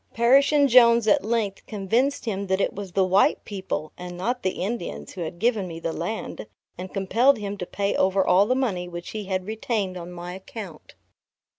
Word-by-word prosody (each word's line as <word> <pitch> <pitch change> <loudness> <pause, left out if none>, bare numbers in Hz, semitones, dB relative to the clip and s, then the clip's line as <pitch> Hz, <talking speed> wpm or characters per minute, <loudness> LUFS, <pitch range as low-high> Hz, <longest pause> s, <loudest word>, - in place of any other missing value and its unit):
Parrish 265 +5 +5
and 290 -2 +4
Jones 235 -2 +6
at 205 - +4
length 215 -3 -1
convinced 225 +8 0
him 200 -3 -3
that 190 0 +1
it - - 0
was 195 -2 -7
the 190 - +3
white 190 +2 +3
people, 190 -6 -4
and 180 0 -8
not 245 +7 -2
the 185 -1 -2
Indians 185 - -4
who 180 - -8
had 170 +1 -5
given 215 -1 +1
me 165 -1 -7
the 165 -1 -3
land, 170 - -5 0.3
and 185 +1 -7
compelled 230 +8 +3
him 205 -1 -4
to 180 - -4
pay 200 0 -1
over 190 0 +2
all 190 +3 +4
the 255 - +2
money 200 -10 -1
which 175 0 -7
he 215 -2 -5
had 185 -1 -2
retained 215 -3 -2
on 175 0 -8
my 175 0 -7
account. 190 -3 -10
195 Hz, 200 wpm, -24 LUFS, 180-230 Hz, 0.3 s, Jones